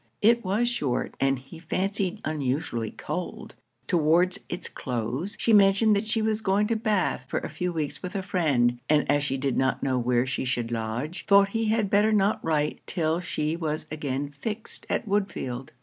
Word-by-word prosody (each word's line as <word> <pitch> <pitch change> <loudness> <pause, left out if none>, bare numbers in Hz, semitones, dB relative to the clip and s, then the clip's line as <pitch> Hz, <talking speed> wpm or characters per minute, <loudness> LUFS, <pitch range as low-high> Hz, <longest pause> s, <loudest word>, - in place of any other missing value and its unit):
It 235 +2 +5
was 210 +5 +1
short, 145 - -1
and 135 0 +2
he 135 +6 -12
fancied 195 +3 -2
unusually 135 -6 -1
cold. - - -5 0.3
Towards 175 +3 +3
it's - - -3
close, 125 - -3
she 230 - +2
mentioned 205 +1 +5
that 205 +2 -1
she 220 0 +1
was 220 0 0
going 205 0 +2
to 230 - +2
Bath 210 - 0
for - - -2
a - - -6
few 180 0 -2
weeks 155 -4 -3
with 180 +3 -6
a 195 - -1
friend, 135 -11 +1
and 150 -1 +3
as 145 0 +2
she 135 -2 0
did 135 -1 -1
not 130 0 +1
know 130 -2 +1
where 120 0 +2
she 130 0 -2
should 120 -2 -1
lodge, 115 +9 -3
thought 200 0 +6
he 225 +2 -1
had 215 -2 +1
better 210 +2 +4
not 205 -1 +2
write 150 -2 0
till 165 -1 0
she 155 -3 -2
was 155 -2 -3
again 145 -2 -3
fixed 220 +4 -5
at - - -1
Woodfield. 170 -11 -2
165 Hz, 185 wpm, -26 LUFS, 135-205 Hz, 0.3 s, thought